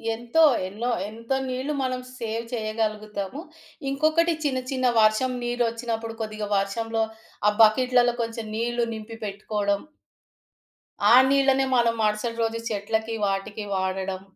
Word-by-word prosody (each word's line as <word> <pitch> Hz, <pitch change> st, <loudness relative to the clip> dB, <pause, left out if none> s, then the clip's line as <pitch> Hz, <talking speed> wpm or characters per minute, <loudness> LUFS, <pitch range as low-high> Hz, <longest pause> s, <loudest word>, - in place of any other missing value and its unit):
ఎంతో 240 Hz, +8 st, +2 dB, 0.2 s
ఎన్నో. 225 Hz, +6 st, -3 dB, 0.2 s
ఎంతో 230 Hz, +4 st, -3 dB
నీళ్లు 260 Hz, +4 st, -2 dB
మనం 255 Hz, -1 st, -1 dB, 0.2 s
సేవ్ 230 Hz, 0 st, -3 dB
చేయగలుగుతాము. 215 Hz, +1 st, -3 dB, 0.5 s
ఇంకొకటి 315 Hz, +4 st, +2 dB
చిన్న 260 Hz, -3 st, +1 dB
చిన్న 255 Hz, -1 st, +1 dB
వర్షం 215 Hz, +4 st, +3 dB
నీరొచ్చినప్పుడు 230 Hz, -1 st, -2 dB
కొద్దిగా 215 Hz, -1 st, -4 dB
వర్షంలో 225 Hz, +3 st, -1 dB, 0.4 s
ఆ -, -, +8 dB
బకెట్లలో 245 Hz, +2 st, +5 dB
కొంచెం 230 Hz, -1 st, -4 dB
నీళ్లు 240 Hz, +1 st, 0 dB
నింపి 220 Hz, +1 st, -8 dB
పెట్టుకోవడం. 205 Hz, 0 st, -1 dB, 1.3 s
ఆ -, -, +9 dB, 0.2 s
నీళ్లనే 270 Hz, -1 st, +3 dB
మనం 235 Hz, -1 st, +3 dB
మరుసటి 215 Hz, +2 st, 0 dB
రోజు 225 Hz, 0 st, -1 dB
చెట్లకి, 220 Hz, +2 st, -2 dB
వాటికి 205 Hz, +2 st, -3 dB
వాడడం. 190 Hz, 0 st, -2 dB
225 Hz, 115 wpm, -25 LUFS, 215-245 Hz, 1.3 s, ఆ